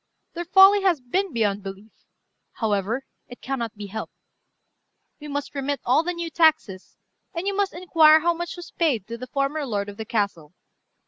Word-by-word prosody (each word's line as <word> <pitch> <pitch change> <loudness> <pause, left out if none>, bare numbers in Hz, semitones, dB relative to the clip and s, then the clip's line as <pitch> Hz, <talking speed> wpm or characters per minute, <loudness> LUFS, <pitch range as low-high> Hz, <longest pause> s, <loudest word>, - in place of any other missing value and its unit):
Their 345 +1 -5
folly 385 +3 +7
has 365 -5 +2
been 360 +10 -2
beyond 210 -4 0
belief; 195 +2 -9 0.6
however, 220 +3 -1 0.2
it 245 - -12
cannot 240 -4 -4
be 205 0 -7
helped. 215 +2 -7 1.0
We 300 - -9
must 285 0 -4
remit 280 0 -2
all 260 +5 +4
the 350 +2 -2
new 340 -1 -5
taxes, 315 - +1 0.4
and 335 +3 -3
you 400 0 -1
must 400 -1 0
inquire 320 -3 +5
how 340 +1 +2
much 345 +1 -6
was 350 - -10
paid 275 - 0
to 230 +2 -7
the 255 - -7
former 275 +3 -1
lord 205 -6 -3
of 200 - -10
the 220 - -6
castle. 195 -8 -2
275 Hz, 180 wpm, -24 LUFS, 215-340 Hz, 1.0 s, folly